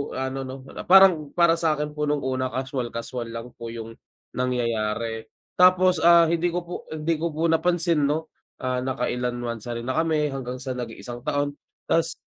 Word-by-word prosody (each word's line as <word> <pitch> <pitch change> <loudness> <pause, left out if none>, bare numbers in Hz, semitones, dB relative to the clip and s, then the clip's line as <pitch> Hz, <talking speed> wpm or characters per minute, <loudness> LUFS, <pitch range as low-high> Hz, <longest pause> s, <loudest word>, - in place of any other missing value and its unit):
ano 130 0 -3
no 130 0 -8
na - - -8
parang, 180 -6 +6
para 170 -1 +4
sakin 150 -2 0
po 150 0 -2
nung 145 -2 0
una 130 0 -1
casual 130 -2 -4
kaswal 115 0 -4
lang 115 +1 -7
po 115 - -6
yung 115 -1 -7 0.4
nangyayari. 115 -3 -1 0.3
Tapos, 185 -1 +5
ah, 170 0 +7
hindi 170 +1 +1
ko 175 +1 -1
po 175 +1 -9 0.2
hindi 155 +1 -1
ko 170 - 0
po 160 - -2
napansin 170 -1 +2
no, 160 +2 -2 0.3
ah, 130 -1 -1
naka 130 -1 -1
ilang 125 0 -2
monthsary 115 0 -4
na 130 +2 -3
kami, 160 -2 +1
hanggang 130 -2 -5
sa 130 -1 -3
nag-isang 120 0 -7
taon. 145 -1 -1 0.3
Tas 165 0 +2
135 Hz, 175 wpm, -24 LUFS, 120-165 Hz, 0.4 s, ah